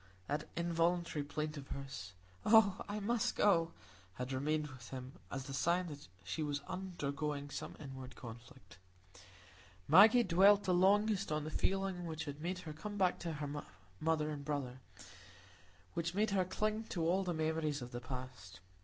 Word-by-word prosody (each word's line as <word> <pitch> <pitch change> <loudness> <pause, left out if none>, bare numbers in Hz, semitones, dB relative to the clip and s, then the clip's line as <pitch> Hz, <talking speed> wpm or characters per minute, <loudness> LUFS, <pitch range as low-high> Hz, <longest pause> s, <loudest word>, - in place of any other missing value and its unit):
That 145 +6 -2
involuntary 170 -2 +1
plaint 150 +1 -3
of 135 -1 -8
hers, 135 -11 -6 0.3
"Oh, 215 -3 +6
I 205 +1 -2
must 225 +2 0
go," 170 -5 +4 0.4
had 125 +4 -4
remained 150 +3 0
with 130 -4 -11
him 130 -1 -6 0.2
as 135 -1 -3
the 135 - -7
sign 170 +7 +2
that 145 -7 -9 0.2
she 125 - -3
was 145 -1 -1
undergoing 150 -5 -3
some - - -5
inward 130 -2 -8
conflict. 120 -2 -11 1.1
Maggie 215 - +8
dwelt 200 +2 +6
the 185 - +2
longest 200 +1 +3
on 150 0 0
the 155 - -5
feeling 190 0 0
which 160 0 -4
had 145 0 -6
made 180 +3 -2
her 155 -3 -7
come 205 +7 -6
back 185 -2 +2
to 170 -2 -3
her 145 -1 -4 0.4
mother 155 -1 +1
and 145 -1 -5
brother, 140 -4 -3 1.1
which 170 +1 -2
made 210 +1 +2
her 190 -2 +2
cling 215 +4 -1
to 175 -6 -2
all 190 +3 +3
the 180 - -1
memories 155 -3 0
of 120 - -8
the 120 - -5
past. 125 -8 -7
155 Hz, 165 wpm, -36 LUFS, 140-185 Hz, 1.1 s, Maggie